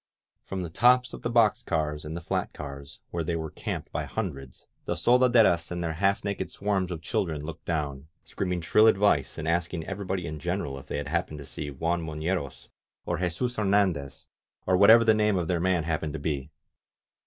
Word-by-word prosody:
From 95 -1 -4
the 85 - -6
tops 125 +6 +4
of - - -8
the - - -2
box 115 -3 +4
cars 75 -3 -2
and 80 +2 -5
the - - -6
flat - - -2
cars, 70 -1 -8
where 85 -1 -2
they 85 +1 -1
were 80 -1 -4
camped - - -5
by - - -2
hundreds, 70 - -5 0.2
the - - -1
soldaderas 120 -9 +4
and 85 0 -3
their 80 -1 -1
half 95 +4 +1
naked 100 -1 -3
swarms 95 -2 -1
of 85 -3 -6
children 80 -4 -2
looked 80 -1 -8
down, 75 -4 -3 0.2
screaming 90 -3 -2
shrill 105 +7 +5
advice 100 - +3
and 80 - -4
asking 85 0 -1
every 100 0 -5
body 95 -1 -2
in 75 -2 -5
general 70 0 -3
if - - -15
they - - -3
had 70 0 -4
happened 85 -2 -1
to 70 - -9
see 75 +2 -6
Juan 85 +5 -1
Mo 80 -1 -5
fieros, 80 -3 -3 0.4
or 85 -2 -2
Jesus 95 +8 -2
Hernandez, 95 - 0 0.4
or 95 - +3
whatever 110 +5 +8
the 110 -1 +5
name 105 -2 +2
of 85 -2 -1
their 90 -1 0
man 90 -1 +1
happened 80 -1 -2
to 80 - -4
be. 70 -2 -3
85 Hz, 205 wpm, -27 LUFS, 75-100 Hz, 0.4 s, whatever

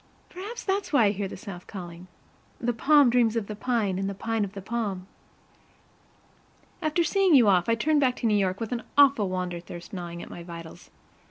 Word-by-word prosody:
Perhaps 410 +6 -7
that 390 +1 +1
is - - -13
why 250 -7 +5
I 200 - +4
hear 200 -1 -3
the - - -8
South 185 -2 -9
calling. 175 -2 -9 0.5
"The 240 0 0
palm 280 +2 +5
dreams 235 -2 +3
of 225 -3 -1
the 210 - -6
pine, 215 -5 -1
and 195 0 -1
the 200 - -5
pine 225 +2 -1
of 195 -1 -5
the 200 - -7
palm." 205 -4 -3 1.8
After 310 +2 +1
seeing 370 +1 +3
you 240 -5 +6
off, 185 0 +3
I 230 - +4
turned 295 +6 +2
back 255 -2 +2
to - - -5
New 220 - +3
York 195 -2 +1
with 225 -2 -4
an 240 -1 -2 0.2
awful 275 -8 +5
wander 180 -1 -3
thirst 175 +1 -10
gnawing 170 -2 -6
at - - -11
my 175 - -8
vitals. 170 -1 -10
215 Hz, 210 wpm, -26 LUFS, 185-255 Hz, 1.8 s, you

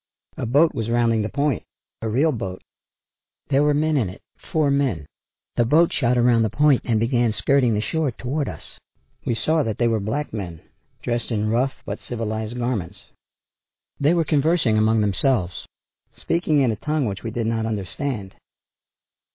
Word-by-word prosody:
A - - -3
boat 145 +7 +4
was 115 0 -3
rounding 115 -1 +2
the 105 - -2
point; 145 -1 0 0.4
a 110 - -2
real 140 +9 +2
boat. 95 -8 -5 0.9
There 140 0 +3
were 150 0 +3
men 155 +1 +2
in 110 -9 +1
it, 95 - -12 0.3
four 155 -3 +2
men. 130 - 0 0.5
The 120 - +4
boat 160 +8 +4
shot 125 -3 +1
around 120 -1 +4
the 110 - +2
point 145 +2 +3
and 115 -3 +1
began 120 -1 +1
skirting 125 -2 +2
the 105 - 0
shore 155 +6 0
toward 135 +5 -3
us. - - -8 0.6
We 120 - 0
saw 155 +7 +1
that 110 -7 -2
they 120 - +2
were 115 -1 +1
black 115 +9 -3
men, 90 -7 -5 0.4
dressed 120 0 -2
in 110 -2 0
rough 130 +4 0
but - - -4
civilized 110 0 -3
garments. 105 -7 -2 1.0
They 150 +5 +3
were 165 -2 +2
conversing 150 -5 +2
among 110 +1 +3
themselves, 105 -2 0 0.5
speaking 160 -4 +1
in 125 -4 +3
a 110 - -3
tongue 150 +1 -1
which 100 -3 -3
we 115 - -4
did 115 +1 -2
not 110 0 0
understand. 105 0 -4
120 Hz, 175 wpm, -23 LUFS, 110-145 Hz, 1.0 s, boat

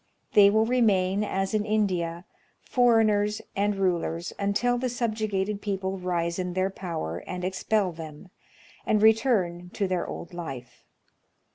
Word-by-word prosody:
They 200 -1 +8
will 220 +2 +3
remain, 205 -5 +2
as 195 -1 -2
in 215 -1 +1
India, 185 -5 -1 0.3
foreigners 215 -4 +2 0.2
and 205 +1 +1
rulers, 175 -3 -1
until 235 +5 +1
the 255 0 -1
subjugated 215 -4 -2
people 195 -2 -3
rise 170 -1 -1
in 180 -1 -2
their 185 +1 0
power 125 - -4
and 180 0 -4
expel 190 +1 0
them, 160 +1 -10 0.5
and 215 - +2
return 210 -6 +2
to 200 - 0
their 185 -2 -1
old 170 - -7
life. 135 -8 -8
195 Hz, 135 wpm, -26 LUFS, 180-215 Hz, 0.5 s, They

